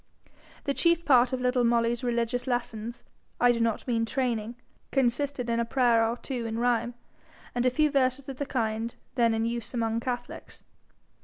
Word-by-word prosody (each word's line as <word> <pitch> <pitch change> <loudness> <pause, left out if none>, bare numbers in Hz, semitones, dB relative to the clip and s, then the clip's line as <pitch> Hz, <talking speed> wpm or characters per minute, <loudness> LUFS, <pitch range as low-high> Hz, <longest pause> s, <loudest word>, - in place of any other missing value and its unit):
The 280 - 0
chief 335 +2 +2
part 250 -2 +5
of 260 - -1
little 250 0 +2
Molly's 235 +1 +2
religious 240 +1 -1
lessons, 240 -2 -3 0.4
I 245 0 +5
do 235 - -1
not 230 +1 0
mean 230 -2 +1
training, 235 -2 -1 0.4
consisted 270 0 0
in 235 0 0
a - - +2
prayer 235 -1 +3
or 230 +2 0
two 245 -3 -4
in 225 0 -3
rhyme, 240 0 +1 0.6
and 245 +1 +1
a - - +6
few 300 +4 +2
verses 265 -1 +1
of 270 -2 -6
the 285 - -3
kind 225 -2 -2 0.2
then 235 -3 +3
in 225 0 0
use 235 0 -3
among 225 -1 0
catholics. 245 0 -6
240 Hz, 175 wpm, -28 LUFS, 230-255 Hz, 0.6 s, a